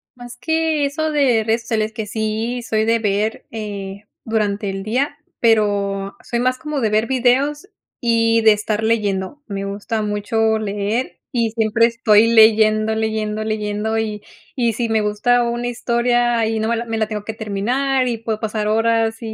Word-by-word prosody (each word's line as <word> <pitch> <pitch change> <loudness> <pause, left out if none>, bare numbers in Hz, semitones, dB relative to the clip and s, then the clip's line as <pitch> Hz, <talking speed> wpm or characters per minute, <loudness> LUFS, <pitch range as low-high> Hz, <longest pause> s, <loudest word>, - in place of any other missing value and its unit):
Más 245 0 -11
que 320 +1 0
eso 310 +2 -2
de 255 -7 +2
redes 225 +1 0
sociales, 220 -1 -1
que 220 -1 -5
sí 220 +3 -2
soy 220 -1 0
de 230 0 +2
ver, 210 +1 -1
eh 205 -2 -6 0.2
durante 210 -2 -1
el 195 0 -5
día, 250 +8 -1 0.2
pero 200 -3 +1
soy 235 - -2
más 255 +1 +1
como 300 -3 -4
de 220 - +1
ver 215 +2 +2
videos 265 +6 +1 0.3
y 230 -1 +3
de 220 -1 +6
estar 210 +1 -2
leyendo. 215 +3 -1
Me 200 -2 -4
gusta 205 +3 -3
mucho 220 +1 0
leer 210 +3 -2
y 230 -3 0
siempre 225 0 +2
estoy 230 -2 +4
leyendo, 220 -1 +5
leyendo, 215 -1 -2
leyendo 215 0 -2
y 210 -2 -3 0.3
y 235 -3 +1
si 235 +1 -1
me 220 -1 +2
gusta 225 +4 +2
una 240 +1 -2
historia 240 -1 +1
y 220 0 -1
no 220 +1 -1
me 235 - +1
la 235 - -3
me 225 -1 -3
la 220 -1 0
tengo 210 -2 -5
que 220 - -4
terminar 250 +6 0
y 235 -2 -1
puedo 220 -1 -3
pasar 215 -1 -2
horas 225 0 +1
220 Hz, 175 wpm, -19 LUFS, 215-240 Hz, 0.3 s, de